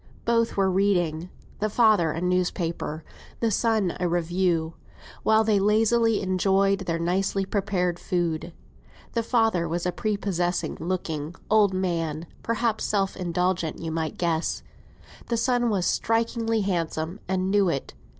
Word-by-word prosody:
Both 230 -2 +1
were 190 -1 +3
reading; 180 -4 +1 0.3
the 215 - 0
father 215 -7 +4
a 155 - -3
newspaper, 175 -3 -1 0.4
the 230 -1 +1
son 215 -4 +1
a 180 - +1
review, 175 -1 0 0.5
while 220 0 +4
they 215 -2 +3
lazily 220 +2 +3
enjoyed 195 +1 +2
their 165 -1 0
nicely 190 +3 0
prepared 190 -4 -1
food. 170 -2 -2 0.6
The 230 - +1
father 225 -7 +1
was 170 +2 -2
a 180 - +1
prepossessing 185 -4 -1
looking 165 -2 -3 0.2
old 205 -3 +4
man; 165 -4 -1 0.2
perhaps 230 -1 -1
self 195 -2 0
indulgent 180 -2 -1
you 165 -1 -4
might 160 -1 -3
guess. 170 -2 -1 0.6
The 235 - 0
son 245 0 +2
was 195 -5 0
strikingly 225 0 0
handsome, 170 -1 -2
and 190 0 0
knew 200 -2 +3
it. 140 -5 -3
185 Hz, 135 wpm, -25 LUFS, 170-215 Hz, 0.6 s, father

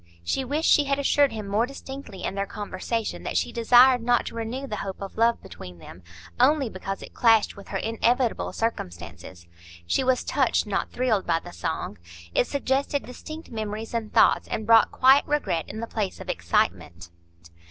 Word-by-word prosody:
She 175 - -1
wished 295 +5 -1
she 295 - +5
had 275 0 0
assured 280 0 +3
him 215 -2 -6
more 210 +4 +1
distinctly 270 -7 -9
in - - -2
their 200 0 -2
conversation 210 +3 -4
that - - -2
she - - 0
desired 245 +2 +5
not 240 +1 +2
to - - -6
renew 230 +4 -4
the 215 -6 -5
hope 195 -1 -5
of 195 -1 -7
love 230 +1 +2
between 90 -1 -10
them, 85 +2 -13 0.4
only 285 -4 +3
because 195 +1 -5
it - - -11
clashed 225 -3 +3
with 200 - -12
her 195 - -3
inevitable 230 +3 0
circumstances. 85 - -5 0.4
She 85 - +1
was 255 -1 +1
touched, - - +1
not - - -2
thrilled 240 -6 0
by 165 -1 +2
the - - -12
song; 85 0 -4 0.3
it - - +2
suggested 280 0 -1
distinct 310 +6 -10
memories 220 0 -5
and 225 -2 -3
thoughts, - - +4
and 220 - -3
brought 225 0 +6
quiet 265 +2 +5
regret 195 - -1
in 220 - -6
the - - -2
place 215 -4 -3
of - - -9
excitement. 85 0 -1
225 Hz, 185 wpm, -25 LUFS, 195-260 Hz, 0.4 s, brought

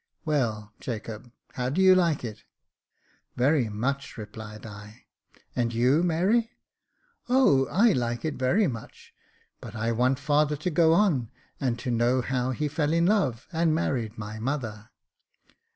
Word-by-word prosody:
Well, 110 -9 -1
Jacob, 115 0 -6 0.2
how 125 0 -2
do 150 +8 -2
you 190 0 +7
like 170 -8 +2
it? 110 -2 -7 0.3
" - - -51
" - - -39
Very 130 -2 +2
much," 140 +7 -3
replied 110 0 -9
I. 105 +1 -11 0.2
" - - -32
And 120 -1 0
you, 125 +7 +3
Mary?" 190 +8 +1 0.4
" 475 - -39
O! 245 - +4
I 225 +5 +4
like 120 0 -2
it 155 - -1
very 130 +12 +2
much; 115 -9 -7 0.5
but 115 -1 -10
I 115 +1 -1
want 125 +3 +2
father 150 +1 +1
to 155 +5 -3
go 160 +1 +4
on, 165 - +2 0.3
and 125 -4 -1
to 125 +1 -4
know 120 +2 +2
how 125 0 -1
he 150 +4 -1
fell 150 +1 -1
in 170 0 +3
love, 150 - +1
and 165 -1 +1
married 120 -8 -2
my 105 +1 -6
mother." 115 -4 -4
130 Hz, 165 wpm, -26 LUFS, 115-160 Hz, 0.5 s, you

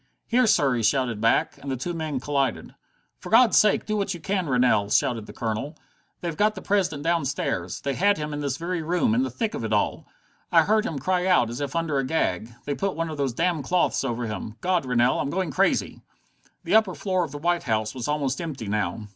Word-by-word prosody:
"Here, 245 0 +3
sir" 140 -10 +3
he 120 - 0
shouted 120 -2 +1
back, 115 - +2
and 140 - -6
the 130 - -2
two 175 +8 -4
men 155 -5 -3
collided. 135 -2 -1 0.5
"For - - -9
God's 230 +1 +6
sake 210 -1 +4
do 215 - -1
what 200 -2 -1
you - - -8
can, 185 0 -1
Rennell!" 125 -5 +3
shouted 115 0 +1
the - - -8
Colonel. 115 +7 -4 0.4
"They've 170 -3 -3
got 215 +3 +2
the - - -7
President 175 -8 0
downstairs. 140 - -1
They 140 - -2
had 200 +8 +2
him 150 -1 -4
in 145 - -3
this 140 -2 -2
very 170 +1 -3
room, 180 +8 +1
in 245 - +2
the 265 - -1
thick 225 -3 -3
of - - -4
it 110 - -3
all. 105 -1 0 0.4
I 165 -1 +6
heard 215 +4 +2
him 160 - -4
cry 180 +6 0
out, 125 -11 +3
as 120 - -5
if 140 0 -4
under 165 -4 0
a - - 0
gag. 120 - -1
They 145 - -1
put 195 +6 -2
one 165 0 -2
of 155 - -6
those 135 -3 -1
damned 165 0 0
cloths 180 0 +1
over 120 -2 -2
him. 110 0 -5
God, 180 -6 0
Rennell, 125 0 +2
I'm - - -1
going 185 +3 -2
crazy!" 195 +1 0 0.6
The 175 +2 -2
upper 215 -5 +4
floor 185 +4 0
of 160 - -5
the 145 - -6
White 175 +3 0
House 110 -1 0
was 125 -3 -5
almost 145 -1 -1
empty 145 -10 -5
now. 105 0 -2
150 Hz, 230 wpm, -25 LUFS, 125-180 Hz, 0.6 s, God's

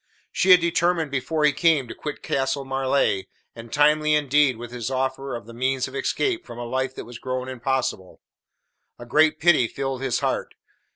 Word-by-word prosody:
She 190 - 0
had 180 -1 +9
determined 170 -2 +1
before 150 +3 0
he 150 - +4
came 150 -3 +2
to - - -7
quit 150 - -7
Castle 135 +1 -1
Marleigh, 135 -6 0 0.3
and 115 0 -11
timely 150 +1 +3
indeed 145 -3 +2
was 120 0 -8
his 120 0 -4
offer 130 0 -2
of 115 - -8
the 115 - -12
means 130 +2 -1
of 130 - -12
escape 350 - -1
from - - -11
a 120 - -5
life 130 +2 -2
that - - -7
was 120 0 -10
grown 130 0 -4
impossible. 130 -6 -3 0.8
A 120 - -10
great 155 +5 +3
pity 155 -8 +4
filled 135 +1 -4
his 135 -3 -1
heart. - - -2
135 Hz, 185 wpm, -24 LUFS, 125-150 Hz, 0.8 s, had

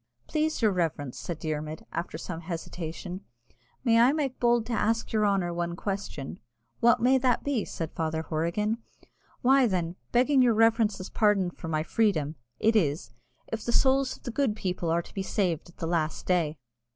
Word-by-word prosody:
"Please 310 -4 -1
your 215 - +5
reverence," 160 -7 -2
said 170 - -4
Dermod, 155 0 -4
after 170 -2 -4
some 165 0 -6
hesitation, 170 +2 -6 0.6
"may 230 -3 +4
I 245 +4 +6
make 280 -4 -2
bold 240 -1 +3
to 240 - -3
ask 225 +1 0
your 215 -1 +3
honour 190 -4 +1
one 170 0 -2
question?" 195 -8 -4 0.4
"What 235 0 +4
may 260 +2 +5
that 250 -2 +2
be?" 275 -7 0
said 165 -2 -5
Father 160 0 -2
Horrigan. 170 +9 -1 0.6
"Why, 265 0 +5
then, 175 -4 -1 0.2
begging 260 +3 +4
your 240 -3 +4
reverence's 220 -4 +2
pardon 205 -4 +2
for 170 - -9
my 155 -1 0
freedom, 160 -7 +1 0.3
it 225 +1 +3
is, 145 - +1 0.4
If 225 - -2
the 235 - -1
souls 265 +1 +3
of - - -28
the 240 - -4
good 250 -3 +1
people 180 -5 -2
are 170 +1 +1
to - - -15
be 195 - -2
saved 180 -4 -1
at 175 - -19
the 165 - -3
last 165 -2 -1
day?" 165 -4 +1
195 Hz, 180 wpm, -28 LUFS, 165-230 Hz, 0.6 s, I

